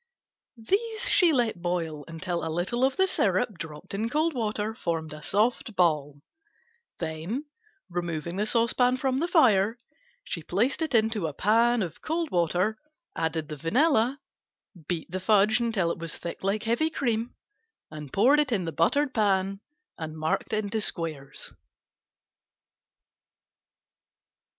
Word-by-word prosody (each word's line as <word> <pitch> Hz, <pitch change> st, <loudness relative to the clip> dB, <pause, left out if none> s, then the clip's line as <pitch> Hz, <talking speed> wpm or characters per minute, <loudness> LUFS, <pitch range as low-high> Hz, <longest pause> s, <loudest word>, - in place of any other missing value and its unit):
These 420 Hz, -, 0 dB
she 355 Hz, -5 st, +6 dB
let 235 Hz, -, 0 dB
boil 165 Hz, -4 st, -2 dB
until 170 Hz, +1 st, -3 dB
a 160 Hz, -, -2 dB
little 180 Hz, +10 st, -1 dB
of 265 Hz, 0 st, +2 dB
the 380 Hz, -, +4 dB
syrup 210 Hz, -, 0 dB
dropped 160 Hz, +4 st, -8 dB
in 220 Hz, +3 st, -1 dB
cold 310 Hz, +4 st, +1 dB
water 220 Hz, -3 st, -2 dB
formed 165 Hz, -, -3 dB
a 150 Hz, -, -9 dB
soft 220 Hz, +5 st, 0 dB
ball, 150 Hz, -5 st, +1 dB, 0.7 s
then 165 Hz, -, -4 dB, 0.4 s
removing 170 Hz, -1 st, -3 dB
the 210 Hz, +2 st, 0 dB
saucepan 245 Hz, +2 st, +2 dB
from 265 Hz, 0 st, 0 dB
the 335 Hz, -, 0 dB
fire, 230 Hz, -, +4 dB, 0.5 s
she -, -, -4 dB
placed 265 Hz, +7 st, 0 dB
it 315 Hz, -6 st, 0 dB
in 225 Hz, 0 st, +3 dB
a 155 Hz, -2 st, -2 dB
pan 230 Hz, +5 st, +3 dB
of 170 Hz, -3 st, -7 dB
cold 325 Hz, 0 st, -2 dB
water, 180 Hz, +5 st, +1 dB, 0.4 s
added 160 Hz, -1 st, -1 dB
the 150 Hz, -, -6 dB
vanilla, 250 Hz, -, +2 dB, 0.7 s
beat 170 Hz, -2 st, -3 dB
the 185 Hz, -, -2 dB
fudge 210 Hz, +3 st, +4 dB
until 220 Hz, -8 st, 0 dB
it -, -, -5 dB
was 165 Hz, -2 st, -4 dB
thick 170 Hz, -, -7 dB
like 200 Hz, +3 st, 0 dB
heavy 235 Hz, +8 st, +1 dB
cream, 235 Hz, -6 st, -1 dB, 0.6 s
and 150 Hz, -3 st, -8 dB
poured 260 Hz, +9 st, +5 dB
it 295 Hz, -3 st, +1 dB
in 195 Hz, -6 st, 0 dB
the 165 Hz, -, -3 dB
buttered 265 Hz, -, +1 dB
pan 195 Hz, -2 st, +1 dB, 0.4 s
and 160 Hz, -1 st, -5 dB
marked 155 Hz, +6 st, -1 dB
in 215 Hz, -2 st, -1 dB
squares. 155 Hz, -8 st, -3 dB
205 Hz, 140 wpm, -27 LUFS, 165-245 Hz, 0.7 s, she